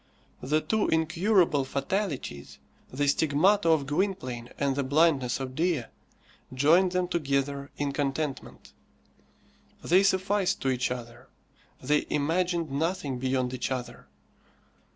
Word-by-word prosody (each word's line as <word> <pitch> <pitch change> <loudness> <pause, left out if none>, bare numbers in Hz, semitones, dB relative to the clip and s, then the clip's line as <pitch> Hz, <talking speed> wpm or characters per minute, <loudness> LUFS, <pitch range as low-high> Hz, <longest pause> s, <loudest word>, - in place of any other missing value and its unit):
The 150 +4 +1
two 220 +4 0
incurable 165 -1 +2
fatalities, 140 - -3 0.3
the 145 +3 -1
stigmata 160 +7 +3
of 155 -4 +3
Gwynplaine 140 -7 -2
and 140 -1 0
the 140 - 0
blindness 140 -3 +2
of 130 -1 -5
Dea, 160 -2 0 0.7
joined 165 +8 +3
them 180 0 0
together 140 -4 -1
in 145 -1 -1
contentment. 140 0 -4 1.1
They 180 +3 +4
sufficed 195 0 +1
to 135 - +1
each 130 0 0
other. 120 0 -7 0.6
They 150 +3 +1
imagined 165 +1 0
nothing 150 -3 -2
beyond 130 -1 -1
each 125 - -3
other. 130 -2 -5
145 Hz, 115 wpm, -27 LUFS, 130-175 Hz, 1.1 s, They